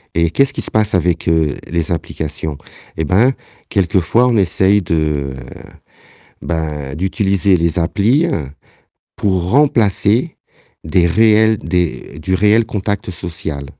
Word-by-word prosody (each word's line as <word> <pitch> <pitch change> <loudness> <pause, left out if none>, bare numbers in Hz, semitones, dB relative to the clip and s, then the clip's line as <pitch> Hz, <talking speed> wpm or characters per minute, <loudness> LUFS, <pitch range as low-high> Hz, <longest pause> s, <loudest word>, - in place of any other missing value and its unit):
Et 85 0 +2
qu'est-ce 135 +12 +1
qui - - -4
se - - -6
passe 110 -1 +1
avec, 90 -1 0
heu, 80 -3 +1 0.2
les 85 -1 -2
applications? 80 -2 -4 0.4
Eh 80 - -1
ben, 105 - +3 0.4
quelquefois, 95 +5 +2
on 120 -2 +2
essaye 95 +1 +2
de 75 -5 -1 1.1
ben, 75 -5 -4
d'utiliser 95 +2 +1
les 85 0 -1
applis, 100 - +2
heu, 85 - -2 0.7
pour 95 -3 -1
remplacer 120 - +2 0.5
des 85 +2 +2
réels 110 +4 +4
des 85 -4 -3
du 95 +4 -2
réel 105 +4 +3
contact 100 -2 -3
social. 80 -5 -6
90 Hz, 125 wpm, -16 LUFS, 80-105 Hz, 1.1 s, réels